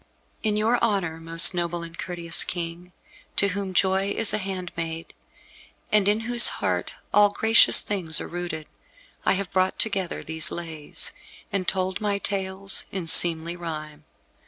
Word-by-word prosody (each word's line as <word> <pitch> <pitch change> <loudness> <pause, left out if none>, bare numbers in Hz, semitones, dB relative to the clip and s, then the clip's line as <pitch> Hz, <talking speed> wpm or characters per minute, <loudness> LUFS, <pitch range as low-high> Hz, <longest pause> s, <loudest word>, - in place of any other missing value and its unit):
In 210 -1 -1
your 225 +3 +1
honour, 195 -8 -1
most 165 +2 +5
noble 175 -1 -3
and 165 0 -11
courteous 170 -2 +1
King, 175 0 -7 0.4
to 200 - +2
whom 200 0 -5
joy 190 +1 +1
is 220 +1 +2
a 215 - -1
handmaid, 170 -4 -6 0.8
and 210 -2 +2
in 210 +2 +1
whose 240 +1 +7
heart - - -3 0.2
all 205 0 +5
gracious 220 +2 +5
things 180 -6 -1
are - - -7
rooted, 175 -3 -6 0.6
I - - +4
have 195 -1 -4
brought 185 0 0
together 195 -5 -3
these 160 0 -1
Lays, 160 -3 -6 0.4
and 190 -2 -2
told 185 0 -2
my 205 -1 -1
tales 195 -1 0
in 190 -3 -5
seemly 165 0 +5
rhyme. 155 -3 -8
185 Hz, 150 wpm, -23 LUFS, 165-200 Hz, 0.8 s, whose